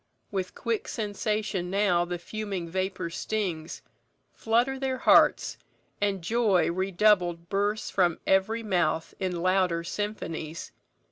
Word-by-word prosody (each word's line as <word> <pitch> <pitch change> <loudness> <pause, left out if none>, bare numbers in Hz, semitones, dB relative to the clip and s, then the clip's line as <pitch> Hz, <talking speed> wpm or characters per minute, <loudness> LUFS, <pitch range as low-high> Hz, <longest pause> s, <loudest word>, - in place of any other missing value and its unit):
With 190 -2 -3
quick 230 -2 -2
sensation 210 -3 -2
now 185 -3 +2
The 175 0 -3
fuming 195 -1 -5
vapour 185 -1 -3
stings; 175 -5 -3 0.5
flutter 240 +4 +1
their 265 -1 -1
hearts, - - +4 0.4
And 195 -3 0
joy 210 -3 +2
redoubled 180 -2 +2
bursts 205 +3 0
from 175 -4 +2
every 215 +4 +2
mouth 175 -6 0
In 180 -3 -2
louder 185 -2 +2
symphonies. 170 -5 -4
190 Hz, 115 wpm, -27 LUFS, 175-215 Hz, 0.5 s, hearts